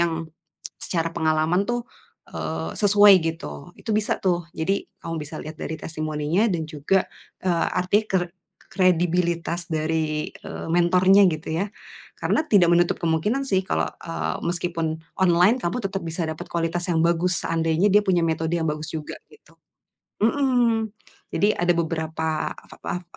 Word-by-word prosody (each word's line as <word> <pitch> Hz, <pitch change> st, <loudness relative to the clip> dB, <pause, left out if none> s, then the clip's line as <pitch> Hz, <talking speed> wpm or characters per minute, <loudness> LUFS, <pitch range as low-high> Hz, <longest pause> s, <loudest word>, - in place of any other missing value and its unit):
yang, 165 Hz, -1 st, -1 dB, 0.5 s
secara 165 Hz, -2 st, -1 dB
pengalaman 160 Hz, +3 st, +1 dB
tuh, 240 Hz, 0 st, -2 dB, 0.5 s
eee, 80 Hz, 0 st, -4 dB
sesuai 205 Hz, 0 st, +7 dB
gitu, 75 Hz, -, -5 dB
itu -, -, -5 dB
bisa 215 Hz, 0 st, 0 dB
tuh. 175 Hz, -2 st, +1 dB
Jadi 195 Hz, +5 st, 0 dB, 0.2 s
kamu 165 Hz, -, -5 dB
bisa 155 Hz, +1 st, -8 dB
lihat 155 Hz, +1 st, -8 dB
dari 160 Hz, -, -4 dB
testimoninya 155 Hz, +5 st, -1 dB
dan 165 Hz, -2 st, -1 dB
juga, 155 Hz, +5 st, +1 dB, 0.4 s
eee, 175 Hz, -3 st, +1 dB
arti 185 Hz, +4 st, +2 dB
ker 180 Hz, -2 st, 0 dB, 0.4 s
kredibilitas 175 Hz, -1 st, +1 dB
dari, 155 Hz, -1 st, -1 dB
eee, -, -, -8 dB
mentornya 185 Hz, +3 st, +5 dB
gitu 155 Hz, -1 st, -5 dB, 0.2 s
ya. -, -, -1 dB, 0.5 s
Karena -, -, +1 dB
tidak 180 Hz, -5 st, +5 dB
menutup 175 Hz, 0 st, +3 dB
kemungkinan 170 Hz, -, +1 dB
sih 190 Hz, -1 st, +2 dB
kalau, -, -, 0 dB
eee, 165 Hz, -1 st, -4 dB
meskipun 170 Hz, -2 st, -2 dB, 0.2 s
online 185 Hz, +6 st, +4 dB
kamu 175 Hz, +8 st, -1 dB
tetep 195 Hz, 0 st, -2 dB
bisa 165 Hz, +1 st, -3 dB
dapet 160 Hz, 0 st, -5 dB
kualitas 170 Hz, +1 st, -1 dB
yang 165 Hz, -, +2 dB
bagus 170 Hz, +1 st, +1 dB
seandainya 165 Hz, +3 st, +1 dB
dia 210 Hz, +1 st, +6 dB
punya 180 Hz, -4 st, +2 dB
metode 160 Hz, 0 st, -1 dB
yang 160 Hz, -, -1 dB
bagus 150 Hz, +1 st, -3 dB
juga, 155 Hz, -2 st, -5 dB, 0.2 s
gitu. -, -, -21 dB, 0.7 s
Mhm. 235 Hz, -4 st, +2 dB, 0.4 s
Jadi 205 Hz, +1 st, +3 dB
ada 175 Hz, 0 st, +2 dB
beberapa 160 Hz, -1 st, -2 dB
ap -, -, -16 dB
ap 180 Hz, -, -3 dB
170 Hz, 150 wpm, -24 LUFS, 160-190 Hz, 0.7 s, sesuai